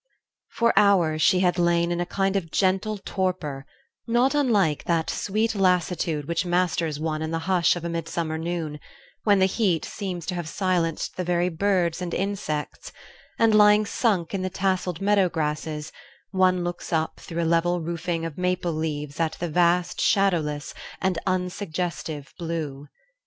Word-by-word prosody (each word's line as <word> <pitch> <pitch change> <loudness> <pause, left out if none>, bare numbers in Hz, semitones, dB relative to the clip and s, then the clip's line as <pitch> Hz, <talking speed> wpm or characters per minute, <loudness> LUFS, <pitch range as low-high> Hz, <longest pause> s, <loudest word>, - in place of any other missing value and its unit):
For 235 0 +2
hours 180 -7 +4
she 180 +3 +4
had 180 -1 +2
lain 170 0 +2
in 175 0 -1
a 175 - -2
kind 195 +1 0
of 180 -4 -1
gentle 195 +4 +1
torpor, 185 -8 -3 0.4
not 240 +4 +3
unlike 210 - +2
that 165 -2 +1
sweet 220 +3 0
lassitude 180 -6 +1
which 170 +1 0
masters 175 -4 0
one 155 0 -2
in 160 - -2
the 165 - -1
hush 180 -3 +3
of 175 -1 -6
a - - -2
midsummer 165 -1 -3
noon, 160 -3 -3 0.5
when 205 -2 +5
the 190 - +4
heat 190 -4 +1
seems 185 -5 -5
to 180 - -3
have 175 -3 -4
silenced 175 -5 -1
the 180 - -1
very 175 0 +1
birds 180 -1 0
and 175 -1 -3
insects, 190 -7 -3 0.5
and, 225 -1 +4
lying 210 0 +6
sunk 200 -6 0
in 195 - -1
the 185 - -1
tasselled 185 -2 -1
meadow 200 -2 +3
grasses, 150 -1 -3 0.4
one 185 -2 +3
looks 175 0 -5
up 160 -1 -1
through 170 0 -4
a - - 0
level 170 +2 +2
roofing 170 0 -3
of 165 0 -6
maple 180 -1 0
leaves 150 -2 -4
at 165 -1 +1
the 175 - -4
vast 175 +2 +2
shadowless, 160 -7 +1 0.3
and 185 -3 0
unsuggestive 180 -5 -3
blue. 155 -4 -4
175 Hz, 160 wpm, -25 LUFS, 160-190 Hz, 0.5 s, lying